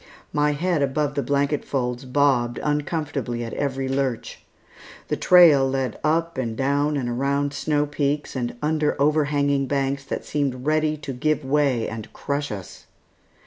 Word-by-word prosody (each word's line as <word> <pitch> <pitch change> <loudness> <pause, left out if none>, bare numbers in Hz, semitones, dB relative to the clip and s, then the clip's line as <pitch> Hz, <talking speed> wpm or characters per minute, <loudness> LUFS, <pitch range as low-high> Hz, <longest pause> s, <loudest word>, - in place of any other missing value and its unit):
My 150 0 +2
head 170 +1 0
above 140 +1 0
the 145 - -1
blanket 140 +1 0
folds 125 -1 -2
bobbed 130 -3 +2
uncomfortably 145 -5 -2
at 115 - -6
every 135 -1 -2
lurch. 135 -3 -2 0.7
The - - +1
trail 160 -7 +6
led 130 -3 -2
up 165 0 0
and 115 -3 -3
down 145 +2 +1
and 130 -3 -2
around 140 +3 0
snow 150 0 0
peaks, 145 0 -2
and 120 -2 -3
under 150 -1 0
overhanging 145 -2 +2
banks 140 0 -1
that - - -4
seemed 135 -3 -2
ready 155 0 +1
to 145 -2 -6
give 155 +3 0
way 135 -4 +1
and 110 0 -7
crush 140 -1 -3
us. 95 -4 -8
140 Hz, 150 wpm, -23 LUFS, 130-150 Hz, 0.7 s, trail